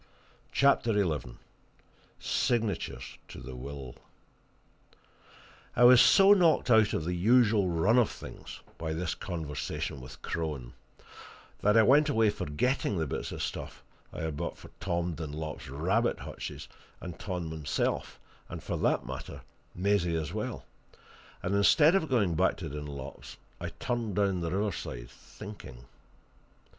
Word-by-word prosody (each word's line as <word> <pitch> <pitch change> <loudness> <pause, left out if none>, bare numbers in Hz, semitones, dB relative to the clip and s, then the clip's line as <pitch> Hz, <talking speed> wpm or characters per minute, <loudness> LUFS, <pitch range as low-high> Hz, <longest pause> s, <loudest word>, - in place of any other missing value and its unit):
CHAPTER 140 -4 +3
XI 75 -11 -1 0.8
SIGNATURES 115 -6 -1
TO - - -10
THE 65 0 -8
WILL 70 0 -7 1.8
I 120 - +4
was 125 0 +9
so 195 0 +7
knocked 170 -9 +3
out 110 -2 +5
of 80 - -1
the 90 - -1
usual 105 +1 +4
run 95 +9 +3
of 120 - +3
things - - -10 0.2
by 80 -1 -2
this 85 +1 -2
conversation 75 -5 -4
with 65 +1 -12
Crone 75 -7 -4 0.9
that 105 +2 +4
I 110 - +7
went 145 +5 +5
away 110 -6 +3
forgetting 105 - -1
the 80 - 0
bits 65 - -4
of - - -4
stuff - - -6 0.3
I - - -6
had 80 -2 -2
bought 85 +1 -4
for - - -13
Tom 85 0 -1
Dunlop's 80 -2 -6
rabbit 95 - 0
hutches - - -7 0.3
and 90 -2 -8
Tom 90 -4 -4
himself, 75 -4 -2 0.3
and, - - -7
for - - -3
that - - +1
matter, - - -7 0.3
Maisie 90 -2 +1
as 80 +1 -3
well; 110 +3 -4 0.8
and, 95 - -1
instead 145 - +5
of 180 -5 +1
going 105 -9 +2
back 80 - +2
to - - -5
Dunlop's, 70 -1 -7 0.2
I - - -4
turned 115 -5 -3
down 100 -3 +1
the 85 - -1
riverside, 85 - -3
thinking. 85 - -11
90 Hz, 140 wpm, -30 LUFS, 75-110 Hz, 1.8 s, was